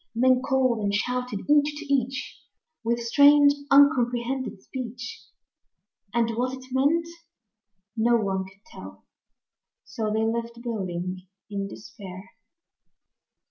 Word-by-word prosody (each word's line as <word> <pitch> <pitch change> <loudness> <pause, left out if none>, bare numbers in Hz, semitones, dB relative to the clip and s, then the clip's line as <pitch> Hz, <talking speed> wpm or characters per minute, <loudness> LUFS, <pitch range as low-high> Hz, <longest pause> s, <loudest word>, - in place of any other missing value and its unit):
Men 255 +2 +4
called 260 -3 +1
and 205 -1 0
shouted 250 0 -2
each 295 0 +3
to 305 - -7
each 270 0 -2 0.4
With 235 +1 0
strange, 285 +4 +6 0.2
uncomprehended 260 -4 +3
speech, 260 - -7 0.9
And 230 0 +1
what 250 +3 -2
it 260 - -13
meant 290 +6 +2 0.9
no 235 +1 +3
one 195 -3 -1
could 190 +3 -18
tell; 95 +1 -12 0.8
So 215 +6 -3
they 220 +1 +1
left 235 +1 -3
building 185 -5 -4 0.2
in 200 -1 -3
despair. 195 0 -11
235 Hz, 110 wpm, -25 LUFS, 205-265 Hz, 0.9 s, strange